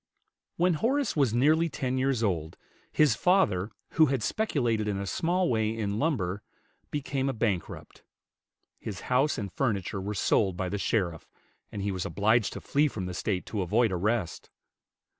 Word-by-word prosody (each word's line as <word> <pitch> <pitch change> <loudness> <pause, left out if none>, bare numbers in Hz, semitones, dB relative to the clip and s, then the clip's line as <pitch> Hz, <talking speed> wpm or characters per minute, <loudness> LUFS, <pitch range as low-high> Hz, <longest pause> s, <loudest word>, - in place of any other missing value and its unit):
When 175 +1 +3
Horace 255 - 0
was 140 -7 +3
nearly 155 +8 +3
ten 130 -3 -2
years 130 -3 +1
old, 80 -6 -1 0.3
his 150 -2 +4
father, 175 - +2 0.2
who 160 -1 +5
had 135 -4 -1
speculated 120 - 0
in 100 -2 -1
a 100 - -3
small 175 - 0
way 110 -4 +1
in 105 -1 -2
lumber, 105 - -1 0.5
became 135 -2 -2
a - - -1
bankrupt; 105 -6 -3 0.8
his 100 -5 -6
house 140 +4 +3
and 100 -5 -5
furniture 100 - -1
were 105 +2 -4
sold 95 -2 +2
by 95 -1 -2
the 105 - -3
sheriff, 90 -7 -1 0.4
and 100 - -5
he 100 - -1
was 95 -2 -3
obliged 110 +1 +1
to - - -7
flee 150 +2 +2
from 105 -9 -4
the 90 - -5
State 90 +1 -2
to 105 - -3
avoid 110 +5 +2
arrest. 95 0 -1
110 Hz, 165 wpm, -28 LUFS, 100-140 Hz, 0.8 s, who